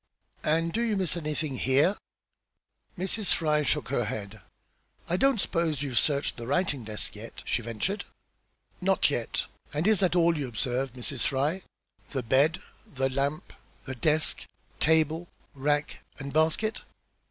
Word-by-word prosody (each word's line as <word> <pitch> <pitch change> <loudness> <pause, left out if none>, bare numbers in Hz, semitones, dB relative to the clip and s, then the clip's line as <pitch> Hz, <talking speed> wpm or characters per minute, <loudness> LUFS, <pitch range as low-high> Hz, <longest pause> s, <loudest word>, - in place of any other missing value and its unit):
"And 165 +2 +1
do 230 - +1
you 225 -3 +1
miss 185 -4 0
anything 155 -4 -2
here?" 140 +11 +3 1.0
Mrs. 190 +3 +1
Fry 150 -2 +2
shook 140 - +1
her 120 -4 +1
head. 105 0 -5 0.7
"I 170 - +1
don't 270 +3 +3
s'pose 165 -7 0
you've 130 -4 +1
searched 140 -2 +1
the 120 -1 -6
writing 140 -3 0
desk 105 -1 -5
yet?" 110 +2 -9
she - - 0
ventured. 120 - -3 0.8
"Not 190 -5 +3
yet. 120 -5 -1 0.3
And 150 +3 -1
is 215 -1 +4
that 185 -2 +2
all 170 -1 +4
you 145 -4 -2
observe, 125 +2 -1
Mrs. 130 +1 -2
Fry? 145 +7 0 0.5
The 130 -3 -2
bed, 140 +9 +3 0.3
the 135 -1 0
lamp, 140 +3 -1 0.3
the 130 - -4
desk, 150 +5 +1 0.3
table, 160 +2 +3 0.3
rack, 145 +2 0 0.2
and 140 0 -6
basket?" 160 +8 +2
150 Hz, 145 wpm, -28 LUFS, 130-170 Hz, 1.0 s, is